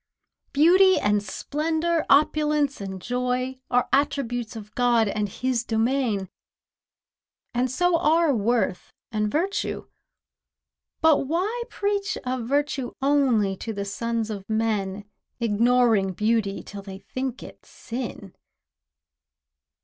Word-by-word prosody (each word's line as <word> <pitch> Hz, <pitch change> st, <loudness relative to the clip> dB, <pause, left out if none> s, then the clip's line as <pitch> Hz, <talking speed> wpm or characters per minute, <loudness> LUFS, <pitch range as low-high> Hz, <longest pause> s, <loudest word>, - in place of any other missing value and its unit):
Beauty 370 Hz, +6 st, +6 dB
and 205 Hz, 0 st, +2 dB
splendour, 315 Hz, -, -1 dB
opulence 295 Hz, -2 st, +3 dB
and 190 Hz, -1 st, -5 dB
joy, 250 Hz, +3 st, -2 dB
Are 245 Hz, 0 st, +2 dB
attributes 255 Hz, -5 st, 0 dB
of 210 Hz, -1 st, -9 dB
God 240 Hz, -3 st, +3 dB
and 205 Hz, 0 st, -1 dB
His 250 Hz, +3 st, -1 dB
domain, 225 Hz, -3 st, 0 dB, 1.3 s
And 250 Hz, +1 st, +1 dB
so 345 Hz, +6 st, +2 dB
are 320 Hz, 0 st, +3 dB
worth 225 Hz, -4 st, 0 dB, 0.2 s
and 210 Hz, -1 st, -1 dB
virtue. 370 Hz, +6 st, -2 dB, 1.1 s
But 310 Hz, -4 st, +4 dB
why 385 Hz, -, -1 dB
preach 405 Hz, -1 st, -1 dB
Of 250 Hz, -2 st, -2 dB
virtue 280 Hz, -2 st, -1 dB
only 265 Hz, -8 st, +2 dB
to 225 Hz, -, -5 dB
the 200 Hz, -1 st, -4 dB
sons 230 Hz, +2 st, -2 dB
of 200 Hz, -1 st, -7 dB
men, 210 Hz, -3 st, -1 dB, 0.3 s
Ignoring 230 Hz, -3 st, +3 dB
beauty, 210 Hz, 0 st, 0 dB
till 200 Hz, -1 st, -8 dB
they 195 Hz, -1 st, -9 dB
think 255 Hz, +6 st, -5 dB
it -, -, -12 dB
sin? 230 Hz, -5 st, -7 dB
245 Hz, 110 wpm, -25 LUFS, 210-285 Hz, 1.3 s, Beauty